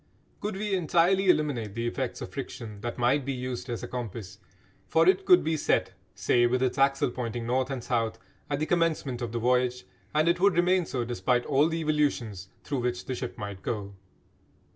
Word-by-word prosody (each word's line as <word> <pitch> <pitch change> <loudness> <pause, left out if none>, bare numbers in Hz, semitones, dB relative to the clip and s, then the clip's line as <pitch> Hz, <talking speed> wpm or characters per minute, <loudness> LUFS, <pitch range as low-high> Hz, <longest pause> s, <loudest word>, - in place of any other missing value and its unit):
Could 210 -1 -3
we 205 +1 -2
entirely 185 +2 +3
eliminate 130 - +1
the 115 0 -2
effects 120 - -3
of - - -6
friction 105 -3 -7
that 120 +1 -4
might 125 +4 +2
be 135 +1 -2
used 125 0 -5
as 120 - -4
a - - -4
compass, 110 -5 -6 0.5
for 165 +1 +3
it 385 - +4
could 360 -2 +6
be 160 - 0
set, 150 - +1 0.2
say 120 -1 +3
with 130 +1 +1
its 130 +1 0
axle 135 -2 +3
pointing 120 -1 -4
north 130 +2 0
and 130 -3 -4
south, 115 -3 -1 0.3
at 145 - 0
the 155 - -1
commencement 160 -7 0
of 120 -2 -3
the 120 - -2
voyage, 125 +1 +1 0.3
and 155 +2 +2
it 170 0 +3
would 195 -1 +4
remain 180 0 +3
so 125 -2 -2
despite 120 +1 0
all 145 +2 +3
the 165 0 -2
evolutions 130 - -1
through 140 -3 -2
which 120 0 -2
the 130 - -3
ship 125 -1 -5
might 100 -2 -6
go. 100 -3 -4
125 Hz, 200 wpm, -28 LUFS, 120-155 Hz, 0.5 s, could